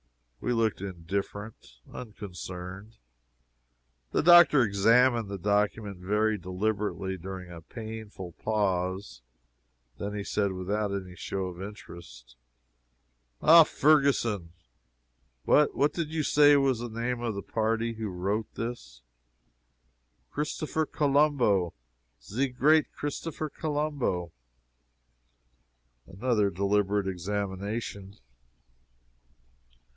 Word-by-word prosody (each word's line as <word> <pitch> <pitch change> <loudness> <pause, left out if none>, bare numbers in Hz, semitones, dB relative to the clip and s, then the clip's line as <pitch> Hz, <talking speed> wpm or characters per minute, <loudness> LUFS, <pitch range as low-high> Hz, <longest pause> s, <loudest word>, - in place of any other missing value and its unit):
We - - -2
looked 110 -4 0
indifferent 100 - -5 0.2
unconcerned. 100 -1 -8 1.1
The - - 0
doctor 175 -5 +8
examined 115 +2 +3
the 100 - -4
document 105 +1 0
very 105 +3 +1
deliberately, 95 +1 -2
during 90 0 -7
a 85 -1 -9
painful 110 -1 -8
pause. 95 - -2 0.8
Then 105 0 -4
he 100 - -3
said, 100 -1 0
without 100 +3 -2
any 95 -2 -5
show 95 +2 -3
of 90 0 -7
interest: 75 - -11 1.1
"Ah 165 0 +9
Ferguson 135 - +2 0.9
what 150 - +4
what 145 +1 +2
did 165 -3 -2
you 160 -1 -1
say 145 0 +6
was 135 -4 +2
the 120 0 -5
name 120 +2 -3
of 115 -3 -2
the 100 - -5
party 115 +1 -1
who 110 -1 -4
wrote 100 +4 -2
this?" - - -6 1.3
"Christopher 155 +1 -2
Colombo! 140 - +2 0.5
ze 125 - -1
great 150 +5 +3
Christopher 155 +1 -4
Colombo!" 145 - -2 1.8
Another 105 +1 +1
deliberate 100 +1 +1
examination. 100 +2 -4
105 Hz, 95 wpm, -28 LUFS, 95-120 Hz, 1.8 s, Ah